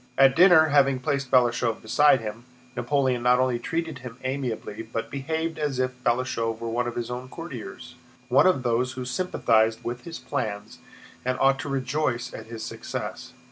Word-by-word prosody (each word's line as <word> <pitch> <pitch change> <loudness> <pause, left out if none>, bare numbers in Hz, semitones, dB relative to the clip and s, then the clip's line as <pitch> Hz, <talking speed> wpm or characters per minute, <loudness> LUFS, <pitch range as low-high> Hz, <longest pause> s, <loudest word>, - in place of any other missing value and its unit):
At 135 -1 +6
dinner, 170 -2 +7
having 140 -2 +4
placed 140 -1 -2
Balashëv 120 -2 +2
beside 135 +4 +4
him, 110 +2 -7 0.3
Napoleon 130 0 +1
not 125 +1 +4
only 130 -2 +1
treated 160 +1 -3
him 125 -1 -9
amiably 130 -5 -3
but 115 0 -5
behaved 160 +3 -3
as 145 -4 -1
if 125 0 -2
Balashëv 120 -2 0
were 115 0 -5
one 120 +1 0
of 120 - -4
his 120 0 -3
own 125 +1 -6
courtiers, 125 - -8 0.3
one 135 +7 +5
of 160 -9 +2
those 125 +1 0
who 130 -1 -5
sympathized 115 -7 +1
with 120 +1 -5
his 170 -1 -6
plans 110 -6 -4 0.4
and 130 0 -1
ought 135 0 +4
to - - -5
rejoice 130 -2 -1
at 110 - -8
his 115 -1 -7
success. - - -6
125 Hz, 175 wpm, -25 LUFS, 120-140 Hz, 0.4 s, dinner